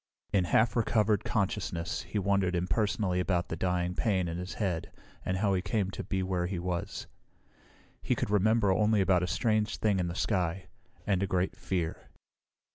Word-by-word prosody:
In 95 Hz, -3 st, +3 dB
half 110 Hz, +6 st, +3 dB
recovered 110 Hz, -3 st, +2 dB
consciousness 95 Hz, -4 st, -1 dB
he -, -, -5 dB
wondered 100 Hz, -2 st, +1 dB
impersonally 90 Hz, +2 st, 0 dB
about 90 Hz, -1 st, 0 dB
the -, -, -2 dB
dying 90 Hz, 0 st, 0 dB
pain 95 Hz, -3 st, +1 dB
in 85 Hz, +1 st, -3 dB
his 90 Hz, +2 st, -5 dB
head 90 Hz, -6 st, -2 dB, 0.3 s
and 90 Hz, -, -1 dB
how 100 Hz, 0 st, +2 dB
he 95 Hz, -, +1 dB
came 100 Hz, -1 st, -1 dB
to -, -, -5 dB
be 95 Hz, -1 st, -1 dB
where 90 Hz, -1 st, -1 dB
he 95 Hz, 0 st, -3 dB
was. 85 Hz, 0 st, -3 dB, 1.0 s
He -, -, +1 dB
could -, -, -2 dB
remember 105 Hz, 0 st, +3 dB
only 105 Hz, +2 st, +3 dB
about 95 Hz, -2 st, +3 dB
a 90 Hz, -, 0 dB
strange 110 Hz, +3 st, +1 dB
thing 105 Hz, -3 st, +1 dB
in 90 Hz, -, 0 dB
the 85 Hz, -, -4 dB
sky, 95 Hz, -2 st, -1 dB, 0.4 s
and 95 Hz, -2 st, +1 dB
a 100 Hz, -, +1 dB
great 90 Hz, 0 st, 0 dB
fear. 85 Hz, -4 st, -3 dB
95 Hz, 180 wpm, -30 LUFS, 90-105 Hz, 1.0 s, In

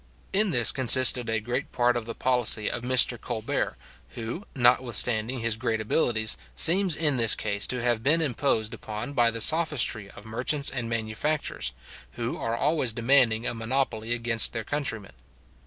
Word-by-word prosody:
In 205 Hz, +1 st, +3 dB
this 120 Hz, -9 st, +4 dB
consisted 130 Hz, -2 st, +5 dB
a 110 Hz, -1 st, -1 dB
great 120 Hz, +5 st, -6 dB
part 120 Hz, 0 st, 0 dB
of 120 Hz, -2 st, -5 dB
the 115 Hz, -, -8 dB
policy 120 Hz, -4 st, +2 dB
of 120 Hz, -, -6 dB
Mr 125 Hz, -1 st, +3 dB
Colbert, 120 Hz, +4 st, -5 dB, 0.4 s
who, 120 Hz, -, -8 dB
notwithstanding 120 Hz, -1 st, +3 dB
his 115 Hz, -1 st, -1 dB
great 115 Hz, -1 st, -3 dB
abilities, 110 Hz, -1 st, -1 dB, 0.2 s
seems 180 Hz, -, +2 dB
in 150 Hz, -4 st, 0 dB
this 115 Hz, -3 st, +4 dB
case 100 Hz, -1 st, -2 dB
to 125 Hz, -1 st, -3 dB
have 120 Hz, -2 st, -1 dB
been 150 Hz, +7 st, +2 dB
imposed 130 Hz, -6 st, -2 dB
upon 110 Hz, +3 st, -8 dB
by 120 Hz, -4 st, +1 dB
the 115 Hz, 0 st, -5 dB
sophistry 150 Hz, -9 st, +2 dB
of 105 Hz, -, -15 dB
merchants 130 Hz, +6 st, -1 dB
and 125 Hz, -3 st, -6 dB
manufacturers, 110 Hz, -, -4 dB, 0.4 s
who 115 Hz, +5 st, -5 dB
are 115 Hz, 0 st, -5 dB
always 145 Hz, -4 st, -1 dB
demanding 120 Hz, -1 st, +1 dB
a -, -, -2 dB
monopoly 115 Hz, -1 st, -4 dB
against 115 Hz, -1 st, +2 dB
their 115 Hz, -2 st, -5 dB
countrymen. 115 Hz, -8 st, -6 dB
120 Hz, 160 wpm, -24 LUFS, 110-135 Hz, 0.4 s, consisted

